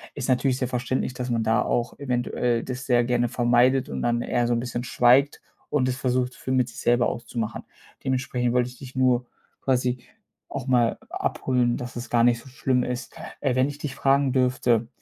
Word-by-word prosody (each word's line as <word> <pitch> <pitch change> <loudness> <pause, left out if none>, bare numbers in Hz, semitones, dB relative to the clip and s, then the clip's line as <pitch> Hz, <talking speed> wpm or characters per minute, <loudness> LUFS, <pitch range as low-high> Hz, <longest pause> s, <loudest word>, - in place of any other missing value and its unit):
ist 140 -3 -4
natürlich 130 0 +2
sehr 125 -2 -1
verständlich, 125 +1 -2
dass 125 0 -4
man 115 -2 0
da 110 0 +2
auch 120 -1 -1
eventuell 120 -2 -1
das 130 0 -5
sehr 120 -1 +4
gerne 120 -1 +1
vermeidet 125 +2 +3
und 65 -2 -4
dann 120 0 +1
eher 120 -1 0
so 120 - +1
'n 115 - +1
bisschen 120 0 -4
schweigt 130 +4 +3 0.3
und 130 -3 +1
das 125 - 0
versucht 125 -1 -1
für 130 - -6
mit 130 -2 +2
sich - - -10
selber 120 0 +3
auszumachen. 115 -1 -4 0.4
Dementsprechend 125 -2 0
wollte 125 0 +2
ich 125 - -14
dich 130 -1 -10
nur 125 -1 +2 0.4
quasi 125 -1 +1 0.5
auch 135 -2 -5
mal 120 -3 +3
abholen, 125 -2 0
dass 125 -1 -7
es 120 +1 -6
gar 120 -1 +3
nicht 120 -1 +4
so 130 - -14
schlimm 125 -1 0
ist. 125 -1 -5 0.3
Äh, 135 -3 +1
wenn 130 +2 +3
ich 145 0 -6
dich 145 -3 -5
fragen 135 -1 +2
dürfte: 125 -3 +2
125 Hz, 200 wpm, -25 LUFS, 120-130 Hz, 0.5 s, sehr